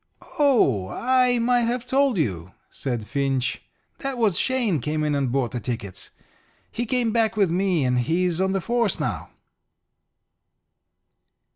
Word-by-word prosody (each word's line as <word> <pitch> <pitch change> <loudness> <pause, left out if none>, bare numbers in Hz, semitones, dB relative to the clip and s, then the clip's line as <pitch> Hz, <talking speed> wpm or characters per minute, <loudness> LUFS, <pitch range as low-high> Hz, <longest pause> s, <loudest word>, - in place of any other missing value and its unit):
"Oh, 140 - +3
I 250 -1 +2
might 240 0 +2
have 240 0 -2
told 270 -2 +2
you," 90 - -2 0.2
said 120 -5 -4
Finch. 135 0 -1 0.4
"That 275 -2 -4
was 215 -8 +2
Shane 240 - +1
came 155 +4 -2
in 150 -1 0
and 140 -3 0
bought 125 -3 0
the 120 - -3
tickets. 100 -4 -6 0.6
He 240 0 -3
came 245 -1 +1
back 225 -1 +1
with 195 -5 +3
me, 180 -5 +1
and 125 0 +1
he's 170 +6 0
on 190 0 +1
the 195 0 -1
force 235 +2 0
now." - - -3
185 Hz, 145 wpm, -24 LUFS, -, 0.6 s, Oh